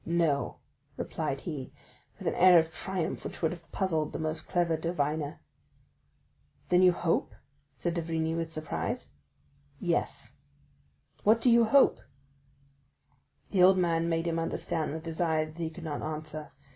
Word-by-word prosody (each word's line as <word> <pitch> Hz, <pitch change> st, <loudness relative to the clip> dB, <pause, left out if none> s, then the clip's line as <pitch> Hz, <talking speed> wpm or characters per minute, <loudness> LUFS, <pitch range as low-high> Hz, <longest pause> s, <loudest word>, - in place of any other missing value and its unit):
"No," 165 Hz, -4 st, 0 dB, 0.4 s
replied -, -, -3 dB
he -, -, -5 dB, 0.5 s
with -, -, -6 dB
an -, -, +1 dB
air 180 Hz, -1 st, +7 dB
of 160 Hz, -1 st, +2 dB
triumph 185 Hz, -2 st, -2 dB
which -, -, -7 dB
would 160 Hz, -, +3 dB
have 170 Hz, -1 st, -10 dB
puzzled 160 Hz, -6 st, -1 dB
the -, -, -2 dB
most 155 Hz, 0 st, -3 dB
clever 175 Hz, -2 st, +1 dB
diviner. 155 Hz, -2 st, -2 dB, 1.3 s
"Then 180 Hz, 0 st, +5 dB
you 185 Hz, -1 st, +7 dB
hope?" 175 Hz, -1 st, 0 dB, 0.4 s
said 175 Hz, -, -2 dB
d'Avrigny, 160 Hz, -1 st, -1 dB
with 165 Hz, -1 st, -3 dB
surprise. 155 Hz, -1 st, -3 dB, 0.7 s
"Yes." 175 Hz, -2 st, -1 dB, 0.9 s
"What 220 Hz, +2 st, +5 dB
do 240 Hz, +1 st, +4 dB
you 235 Hz, 0 st, +6 dB
hope?" 270 Hz, +5 st, +5 dB, 1.5 s
The 190 Hz, -, +3 dB
old 185 Hz, +1 st, +7 dB
man 170 Hz, -2 st, +1 dB
made 165 Hz, 0 st, 0 dB
him 165 Hz, -1 st, 0 dB
understand 165 Hz, -1 st, -2 dB
with 160 Hz, +2 st, -6 dB
his 165 Hz, +1 st, -4 dB
eyes 155 Hz, -2 st, +1 dB
that 170 Hz, -, -8 dB
he 165 Hz, -, -1 dB
could 165 Hz, +1 st, -11 dB
not 155 Hz, -3 st, -4 dB
answer. 155 Hz, 0 st, -5 dB
165 Hz, 150 wpm, -29 LUFS, 155-175 Hz, 1.5 s, air